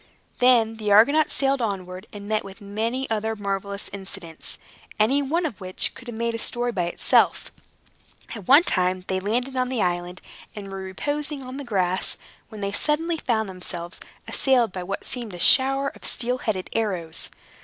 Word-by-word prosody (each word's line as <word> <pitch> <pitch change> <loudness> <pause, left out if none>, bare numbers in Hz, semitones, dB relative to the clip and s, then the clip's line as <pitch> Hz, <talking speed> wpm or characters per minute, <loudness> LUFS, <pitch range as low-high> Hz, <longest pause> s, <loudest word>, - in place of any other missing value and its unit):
Then 235 -3 +4
the 210 -2 -1
Argonauts 285 +10 +6
sailed 275 -1 +3
onward 185 -4 -4
and 205 -1 -9
met 215 0 0
with 195 +1 -11
many 225 +6 -2
other 220 0 0
marvelous 200 -1 -3
incidents, 190 -4 -8 0.4
any 260 +7 +4
one 330 +5 0
of 225 -12 -5
which 185 0 -1
would 240 -1 -9
make 230 +1 -2
a 230 - -3
story 240 +1 +1
by 185 -6 -1
itself. 175 - +2 0.8
At 210 -6 -8
one 285 +5 +8
time 185 - 0
they 190 0 0
landed 245 +7 -1
on 255 0 0
an 255 - -1
island, 175 -1 -1 0.4
and 200 -2 -7
were 195 - -5
reposing 290 +9 -3
on 255 +1 -7
the 285 - -5
grass, 185 -6 +1 0.3
when 215 -3 -9
they 200 0 -1
suddenly 320 +9 +1
found 225 -7 0
themselves 180 -2 -5 0.3
assailed 250 -6 +3
by 185 - -5
what 195 +2 -5
seemed 235 -6 -3
a - - -9
shower 270 +7 +5
of - - -17
steel 250 +1 0
headed 200 -7 -2
arrows. 185 -8 -1
215 Hz, 175 wpm, -24 LUFS, 190-255 Hz, 0.8 s, one